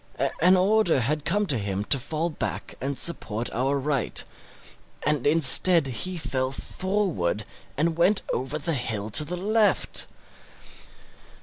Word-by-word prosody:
An 185 +2 +5
order 195 -4 +2
had 150 +5 -3
come 205 +4 0
to 140 - 0
him 100 -1 -3
to 135 +5 +3
fall 160 +6 -3
back - - -6
and 135 +1 -4
support 120 -9 +2
our 135 +4 -1
right; 140 0 -1 0.8
and 145 -3 -1
instead 165 +2 +6
he 175 +9 -4
fell 135 -4 -3
forward 160 - -3 0.3
and 165 +2 -1
went 190 +4 +3
over 130 +4 -3
the 160 +2 -3
hill 110 -5 -5
to 130 - +5
the 180 +4 -4
left. 210 +3 +1
150 Hz, 135 wpm, -24 LUFS, 130-180 Hz, 0.8 s, instead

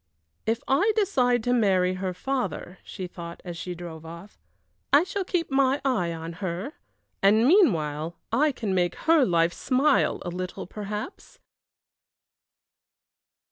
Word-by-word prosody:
"If 225 +1 +1
I 390 +12 +3
decide 250 - +2
to 245 - +1
marry 190 -6 +3
her 185 0 -3
father," 195 -3 -3
she 185 - -7
thought, 170 -1 -8
as 175 -1 -5
she 180 +1 -5
drove 165 -2 -8
off, 170 +5 -11 0.5
"I 285 +3 +6
shall 390 +1 -3
keep 355 -4 -2
my 270 +1 +3
eye 215 -11 +1
on 165 0 -6
her, 185 - -3 0.5
and 215 +4 +5
meanwhile 170 - +2
I 295 +7 +3
can 220 -7 -3
make 175 -2 +1
her 320 -2 +5
life 170 -5 +2
smile 270 +3 +2
a - - -2
little 180 +1 -5
perhaps!" 210 - -7
200 Hz, 140 wpm, -26 LUFS, 175-270 Hz, 0.5 s, I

